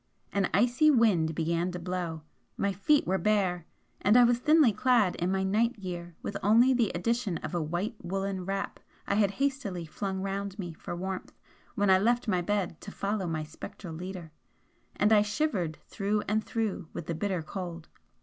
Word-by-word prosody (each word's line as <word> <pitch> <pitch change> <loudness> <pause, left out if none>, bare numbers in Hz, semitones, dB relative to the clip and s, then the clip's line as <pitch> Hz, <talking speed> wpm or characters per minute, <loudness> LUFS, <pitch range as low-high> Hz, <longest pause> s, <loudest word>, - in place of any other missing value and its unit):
An 200 -2 +1
icy 245 +8 +4
wind 200 - +3
began 170 +2 0
to - - -3
blow, 175 -3 -4 0.3
my 200 0 0
feet 280 +10 +3
were 190 +1 +1
bare, 190 -5 +1 0.3
and 210 +5 +5
I 245 - +8
was 240 0 +3
thinly 300 -4 +5
clad 240 -6 +3
in 175 +2 0
my 190 0 +1
night 220 +4 +1
gear 175 -3 -6
with 200 - -4
only 230 +6 +5
the 235 -5 +2
addition 215 0 0
of - - -5
a 175 - 0
white 175 +8 -2
woollen 195 +1 -2
wrap 195 +2 -3 0.3
I - - 0
had 200 -1 +3
hastily 225 -7 -2
flung 190 +4 -4
round 195 0 -3
me 175 -5 -5
for 165 - -7
warmth 185 +1 -5 0.4
when 200 -1 +3
I 185 - +6
left 240 +4 +1
my 185 -4 +2
bed 185 -3 -2
to - - -8
follow 200 -2 -2
my 160 -2 -2
spectral 160 +3 -9
leader 180 -1 -7 0.6
and 210 +2 +3
I 210 - +7
shivered 205 - -1
through 210 0 -1
and 215 +1 +1
through 220 -8 -2
with 170 - -5
the 170 - -2
bitter 180 0 -2
cold. 170 -2 -6
195 Hz, 185 wpm, -29 LUFS, 175-215 Hz, 0.6 s, I